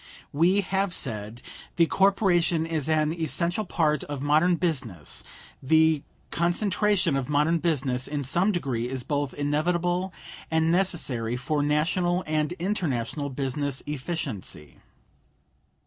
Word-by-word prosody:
We 175 +7 +3
have 195 -1 -1
said: 110 -1 -3 0.3
"The 170 - +5
corporation 180 -3 +2
is 160 -3 -2
an 155 0 +2
essential 170 +5 -1
part 155 -5 +1
of 145 -2 -5
modern 155 +5 +4
business. 130 - -2 0.4
The 160 +2 +4 0.3
concentration 185 0 +2
of 135 -1 -2
modern 150 +3 +2
business, 135 -6 0
in 145 0 -3
some 175 +10 +2
degree, 130 - -2
is 130 -1 -4
both 145 0 -1
inevitable 175 +5 0 0.4
and 160 0 +2
necessary 150 - 0
for 145 +3 -1
National 175 +5 +1
and 155 0 0
international 155 - -2
business 135 +1 -2
efficiency." 135 - -5
155 Hz, 115 wpm, -26 LUFS, 140-175 Hz, 0.4 s, The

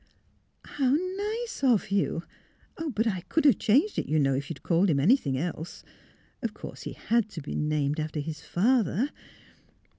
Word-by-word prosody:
' - - -39
' - - -25
How 265 0 +4
nice 405 +4 -3
of 240 -7 +3
you!... 195 -4 0 0.7
But 220 +3 +2
I 190 -6 0
could 320 -2 +1
have 280 - +6
changed 285 - +3
it, - - -3
you 155 - +2
know, 135 -2 +3
if 135 +1 -3
you'd 165 - -7
called 175 +3 +3
him 145 -4 +2
any 190 - +6
thing 140 - -2
else. 160 +2 -5 0.6
Of 225 -3 -3
course - - -9
he - - -6
had 230 -1 0
to 165 - -7
be - - -5
named 150 0 0
after 155 0 -3
his 150 0 -5
father." 225 - +1
195 Hz, 185 wpm, -28 LUFS, -, 0.7 s, have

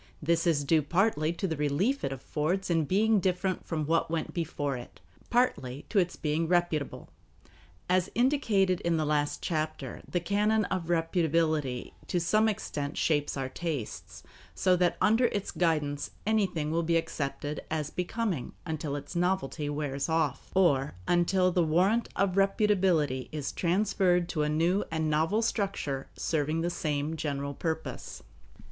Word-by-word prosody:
This 165 +2 +1
is 150 -4 +2
due 155 +2 +3
partly 165 0 +1
to 190 +3 -2
the 160 - -2
relief 155 - 0
it 135 - -1
affords 155 +8 -2
in 165 -2 +2
being 210 +6 +3
different 185 0 -1
from 155 -3 -1
what 165 +2 +1
went 165 -1 -2
before 145 -4 -2
it, 120 -1 -10 0.3
partly 150 - 0
to 210 - +3
its 180 -1 0
being 155 +2 -1
reputable. 175 -4 0 0.8
As 185 0 +2
indicated 225 -8 +2
in 170 -1 +1
the 155 - 0
last 150 -1 0
chapter, 155 -5 -3
the 175 - 0
canon 210 +4 +1
of 185 -3 -3
reputability 165 -5 0 0.2
to 175 - 0
some 215 +6 +3
extent 145 -9 -4
shapes 145 -3 +1
our 135 -1 -2
tastes, 105 - -5 0.3
so 185 -1 +3
that 180 -1 +2
under 225 +4 +4
its 205 -4 -1
guidance 150 -4 0 0.2
anything 195 -8 +1
will 165 +1 +1
be 165 0 +2
accepted 150 -2 -3
as 155 -2 -2
becoming 180 - -2
until 155 -3 -3
its 145 +5 -7
novelty 170 -4 0
wears 145 -1 -2
off, 160 -4 0
or 145 - +3
until 180 +1 +3
the 180 - +2
warrant 185 +9 +2
of 195 -1 +1
reputability 190 -9 +2
is 150 -3 -3
transferred 180 -1 +2
to 155 - -1
a 150 - +1
new 170 +6 +2
and 160 -1 -1
novel 160 +9 +2
structure 195 - -2
serving 155 +1 0
the 175 +1 0
same 150 -1 -2
general 140 -2 -3
purpose. 160 +2 -4
165 Hz, 155 wpm, -29 LUFS, 150-185 Hz, 0.8 s, under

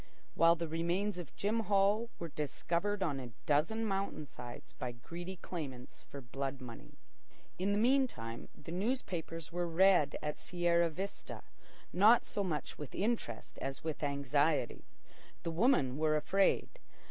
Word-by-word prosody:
While 165 +1 +6
the 170 0 -3
remains 175 +5 0
of 170 - -8
Jim 215 +3 +1
Hall 210 +2 +3
were 170 - -5
discovered 170 +7 -1
on 145 -6 0
a 125 -2 -6 0.2
dozen 160 +10 +2
mountain 195 -6 -1
sides 120 -3 -10
by 125 -1 -4
greedy 175 +10 -7
claimants 140 -9 -7
for 140 - -7
blood 135 +2 -4
money. 120 -3 -10 0.6
In 195 +2 +1
the 205 - +2
meantime 225 - +1
the - - -9
newspapers 175 - -2
were 175 0 -1
read 175 -3 +5
at 150 0 -2
Sierra 170 -1 +2
Vista, 190 +5 -6 0.5
not 215 +6 +6
so 205 - -2
much 160 -6 -3
with 150 -3 -7
interest 205 - -2
as 135 0 -4
with 160 -2 -3
anxiety. 140 -1 +1 0.6
The 165 - -1
women 165 - +3
were 155 0 +3
afraid. 195 - +2
170 Hz, 145 wpm, -34 LUFS, 145-195 Hz, 0.6 s, While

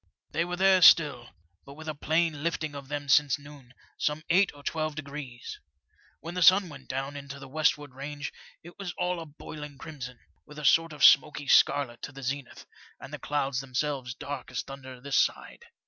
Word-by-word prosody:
They 170 - 0
were 180 0 -3
there 190 0 +4
still, 145 -8 +6 0.3
but 140 - -12
with 160 +1 -11
a 155 - -2
plain 155 0 0
lifting 160 -2 -2
of 140 -1 -8
them 145 0 -4
since 140 -1 +4
noon, 140 -3 -15 0.2
some 150 +1 -1
eight 190 +3 +4
or 145 - -14
twelve 155 +1 -2
degrees. 140 -5 -7 0.6
When 170 +1 -7
the 180 - -3
sun 185 +1 +6
went 140 -3 -12
down 135 +2 -4
into 140 -1 -8
the 135 0 -10
westward 145 -1 0
range 145 +2 -6 0.3
it 175 +4 -14
was 195 -3 -5
all 180 -1 -1
a 165 - -8
boiling 150 -1 -9
crimson, 130 -6 -8 0.3
with 150 0 -14
a 150 - -5
sort 165 +4 +4
of 150 - +3
smoky 145 0 +5
scarlet 135 -4 +3
to - - -6
the 135 -1 -10
zenith, 135 0 -5 0.3
and - - -11
the - - -5
clouds 140 -2 -1
themselves 135 -1 -3
dark 140 -3 -6
as - - -3
thunder 130 -2 -10
this 140 +2 -1
side. 470 - -1
145 Hz, 195 wpm, -28 LUFS, 135-155 Hz, 0.6 s, still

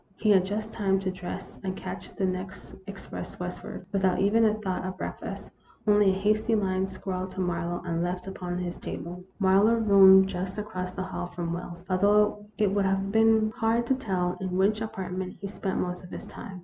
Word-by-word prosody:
He 215 +1 +2
had 190 -2 +6
just 215 +3 -3
time 195 -3 +1
to 190 -1 -1
dress 185 +1 -7
and 190 -1 -2
catch - - -7
the 195 - 0
next 185 +1 -5
express 200 -1 -8
westward, 180 0 -6
without 190 -2 +2
even 220 +4 +4
a 215 -1 +3
thought 190 -4 -3
of 185 0 -4
breakfast, - - -6 0.3
only 205 -2 +5
a 190 0 +1
hasty 215 +2 +2
line 190 -2 +1
scrawled 185 -1 -4
to - - -7
Marlowe, 175 -1 -1
and 170 -1 -1
left 180 +1 -2
upon 180 -2 -4
his 180 -1 -4
table. 180 +2 -6
Marlowe 200 +3 +4
roomed 195 -3 +7
just 185 +1 -4
across 185 -3 -4
the 190 - -2
hall 185 -1 -4
from 175 -1 -4
Wells, 175 0 -7
although 205 +2 +3
it 205 -3 +2
would 200 -1 +2
have 195 +1 0
been 220 0 +4
hard 230 +1 +1
to 265 - +2
tell 185 -8 -1
in 185 -1 -2
which 210 +3 +2
apartment 190 -3 -4
he 200 - -6
spent 195 -1 -3
most 180 0 -3
of 180 - -11
his - - -7
time. 195 -5 -9
190 Hz, 200 wpm, -27 LUFS, 185-210 Hz, 0.3 s, roomed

